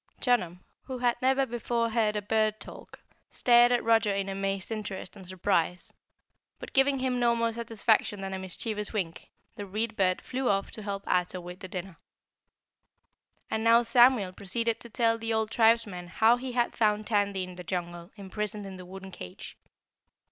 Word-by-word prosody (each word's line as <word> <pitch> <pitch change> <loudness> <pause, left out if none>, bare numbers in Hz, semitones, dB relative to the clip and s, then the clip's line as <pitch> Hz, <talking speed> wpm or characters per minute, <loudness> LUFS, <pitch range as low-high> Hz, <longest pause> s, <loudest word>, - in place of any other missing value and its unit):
Chunum, 180 -8 0 0.2
who 260 -1 -5
had 245 -1 +2
never 265 +1 +3
before 235 -1 -1
heard 220 -2 +1
a 210 - -2
bird 215 0 +1
talk, - - -11 0.3
stared 240 0 +5
at 245 - +2
Roger 225 -2 +3
in 195 0 -2
amazed 195 +1 -3
interest 210 -4 -5
and 195 - -11
surprise, 180 -1 -1 0.6
but - - -10
giving 275 0 +4
him 255 -1 -1
no 235 -1 +3
more 230 -1 0
satisfaction 225 -2 0
than 195 0 -5
a 190 - -3
mischievous 210 +3 -4
wink, 180 -7 -4 0.3
the 205 - -5
Read 215 +3 -2
Bird 185 -2 +2
flew 255 0 -2
off 195 0 0
to 220 - -8
help 200 -1 -5
Ato 180 0 0
with 180 +1 -9
the 190 - -7
dinner. 185 -1 -7 1.5
And 220 - -1
now 230 +1 +6
Samuel 240 -5 +4
proceeded 225 +5 -1
to 235 - -9
tell 230 0 +1
the 225 0 -3
old 220 0 -1
tribesman 220 -6 +2
how 220 +6 +4
he 250 0 -6
had 240 -1 0
found 215 -1 +1
Tandy 200 -3 0
in 185 0 -7
the 180 0 -9
jungle 175 -1 -5
imprisoned 210 0 -5
in 190 -1 -8
the 180 -1 -10
wooden 190 +1 -9
cage. 90 - -10
210 Hz, 175 wpm, -28 LUFS, 190-235 Hz, 1.5 s, now